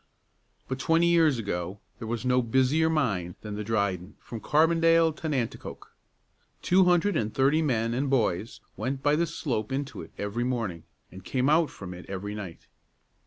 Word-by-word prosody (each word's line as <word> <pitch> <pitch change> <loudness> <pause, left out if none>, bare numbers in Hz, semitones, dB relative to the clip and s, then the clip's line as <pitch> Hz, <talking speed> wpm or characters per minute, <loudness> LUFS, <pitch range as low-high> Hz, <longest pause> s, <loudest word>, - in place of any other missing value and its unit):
But 130 0 -4
twenty 165 +4 +3
years 165 -5 +4
ago 95 -3 -4 0.2
there 115 - -6
was 120 +1 -3
no 125 0 +3
busier 130 +7 +2
mine 100 - 0
than 105 -1 -6
the 105 +1 -4
Dryden 100 -3 -1
from 115 - -8
Carbondale 165 +3 +3
to 160 - -4
Nanticoke. 130 -6 -4 0.7
Two 185 +1 +4
hundred 180 +3 +3
and 110 0 0
thirty 140 +6 +3
men 115 -6 0
and 135 +3 -1
boys 110 -5 0
went 135 +1 -3
by 145 +1 +4
the 170 +2 +1
slope 125 -9 -3
into 135 -3 -3
it 80 - -11
every 105 +4 -2
morning, 115 -10 -3 0.3
and 95 0 -11
came 130 +6 0
out 160 0 +4
from 90 -2 -9
it 90 0 -11
every 100 +2 -4
night. 100 -5 -8
125 Hz, 170 wpm, -27 LUFS, 105-155 Hz, 0.7 s, years